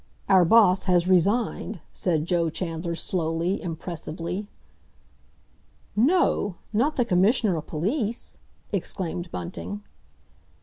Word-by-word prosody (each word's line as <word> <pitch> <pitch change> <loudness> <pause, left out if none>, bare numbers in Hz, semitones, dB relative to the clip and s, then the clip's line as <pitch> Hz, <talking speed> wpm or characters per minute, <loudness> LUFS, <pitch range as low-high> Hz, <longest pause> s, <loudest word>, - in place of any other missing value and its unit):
"Our 190 -2 +6
Boss 190 -1 +5
has 180 -2 +3
resigned!" 200 +2 +1
said 160 -4 0
Joe 170 -2 +1
Chandler 165 0 -3
slowly, 165 +2 -1
impressively. 170 +2 -5 1.5
"No! 240 - +2 0.2
Not 275 +8 +2
the 245 - +2
Commissioner 200 0 +3
o' 160 - -2
Police?" 210 - -2 0.3
exclaimed 175 -1 -2
Bunting. 90 - -6
180 Hz, 95 wpm, -25 LUFS, 165-210 Hz, 1.5 s, Our